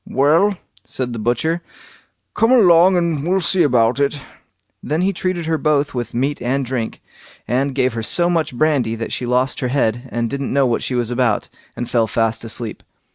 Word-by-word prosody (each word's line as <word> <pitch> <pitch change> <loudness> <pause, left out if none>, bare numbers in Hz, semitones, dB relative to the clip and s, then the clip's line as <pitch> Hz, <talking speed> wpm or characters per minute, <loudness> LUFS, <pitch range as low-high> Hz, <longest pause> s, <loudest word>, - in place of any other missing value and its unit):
"Well", 165 +9 +3 0.3
said 125 -2 -4
the 115 - -5
butcher, 125 +10 0 0.7
"come 225 +2 +2
along 185 -6 +6
and 165 -5 0
we'll 185 +4 +1
see 185 +1 +1
about 125 -4 +3
it." 140 +1 0 0.6
Then 155 +3 -1
he 195 +1 +1
treated 180 -1 -2
her 160 -1 0
both 145 -1 +1
with 120 -2 -4
meat 140 +4 -1
and 135 +2 -1
drink, 120 -3 -4 0.4
and 135 +3 0
gave 130 -2 +1
her 115 - -3
so 170 +10 +2
much 165 -7 -1
brandy 140 -7 +1
that 115 0 -5
she 125 - -3
lost 125 +2 +1
her 125 - -1
head, 125 -1 -1
and 120 0 -1
didn't 140 +2 -4
know 140 0 +3
what 120 -2 0
she 130 - -3
was 120 -1 -1
about, 120 -3 0 0.3
and 120 - -4
fell 115 -2 +1
fast 115 +1 -1
asleep. 115 -1 -4
135 Hz, 190 wpm, -19 LUFS, 120-160 Hz, 0.7 s, along